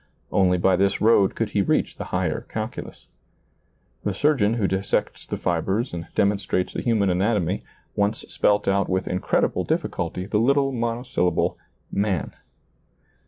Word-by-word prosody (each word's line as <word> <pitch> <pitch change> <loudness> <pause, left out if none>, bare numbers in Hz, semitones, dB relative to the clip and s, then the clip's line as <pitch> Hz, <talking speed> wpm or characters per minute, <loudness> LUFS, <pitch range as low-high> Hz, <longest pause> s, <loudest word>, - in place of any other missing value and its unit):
Only 90 -1 +3
by 90 +1 +3
this 100 +1 +2
road 105 -3 +4
could 115 -2 -1
he 100 - +2
reach 95 - 0
the - - -5
higher - - -2
calculus. - - -6 1.0
The 105 -2 -1
surgeon 115 -5 +2
who 110 -4 0
dissects 95 +1 -1
the - - -3
fibers 95 +8 -1
and 85 -1 -5
demon 100 0 +2
strates 90 -1 -1
the - - -3
human 105 -5 +2
anatomy 95 -1 +1 0.3
once 105 +2 0
spelt 105 0 +1
out 100 0 +2
with 95 0 0
incredible 90 - 0
diiliculty 90 +1 -2
the 105 0 +1
little 135 +3 +3
monosyllable 115 -7 0 0.2
" - - -39 0.2
man." 90 -9 -2
100 Hz, 150 wpm, -24 LUFS, 95-115 Hz, 1.0 s, road